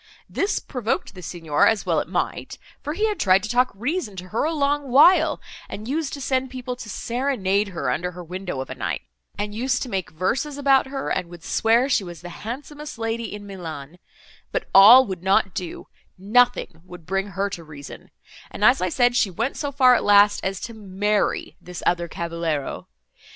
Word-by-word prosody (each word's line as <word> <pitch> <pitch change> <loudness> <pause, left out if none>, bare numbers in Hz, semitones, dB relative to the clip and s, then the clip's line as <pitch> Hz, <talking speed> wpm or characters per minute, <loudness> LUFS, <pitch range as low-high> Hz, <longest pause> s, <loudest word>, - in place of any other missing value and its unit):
This 400 +2 -1
provoked 245 -5 -3
the 185 - -11
Signor, 165 -3 +1
as 220 -2 +1
well - - +2
it - - -4
might, - - -3 0.2
for 295 - -4
he 425 +6 0
had 420 -2 -3
tried 190 0 +4
to 215 - -4
talk 245 +2 +3
reason 245 - -3
to 185 0 -8
her 225 +8 0
a 320 - 0
long 290 -2 0
while, 310 +4 +5 0.3
and 215 +2 -7
used 290 +1 -2
to 280 - -6
send 260 0 0
people 250 -1 -5
to 230 -3 -9
serenade 215 -4 -1
her, 180 -4 -2
under 180 +1 -2
her 180 +1 -8
windows, 180 -5 -5
of 130 - -12
a - - -2
night; 95 - -4 0.3
and 205 0 -3
used 250 +3 -1
to 255 - -7
make 190 -4 -3
verses 250 - -2
about 270 -2 +3
her, 270 0 -4
and 180 -2 -2
would 170 -1 -12
swear 230 +7 +2
she 250 -7 +1
was 175 -3 -9
the 175 - -8
handsomest 290 +5 -7
lady 225 0 -3
in 205 0 -8
Milan—But 170 -4 -8
all 230 +7 +9
would 190 -5 -6
not 190 0 +2
do—nothing 190 +1 -1
would 180 -2 -12
bring 195 +3 -1
her 200 0 -2
to 170 - -6
reason; 150 -3 -11 0.4
and, - - -1
as 250 +2 +5
I 185 - +1
said, 245 +5 +2
she 215 - +3
went 230 +9 -2
so 285 -2 -3
far 260 -2 +5
at 245 - +2
last, 205 0 +5
as 190 0 -2
to 230 - -6
marry 205 0 -1
this 180 -1 -9
other 175 -1 +1
cavaliero. 165 -4 -3
210 Hz, 195 wpm, -23 LUFS, 180-260 Hz, 0.4 s, all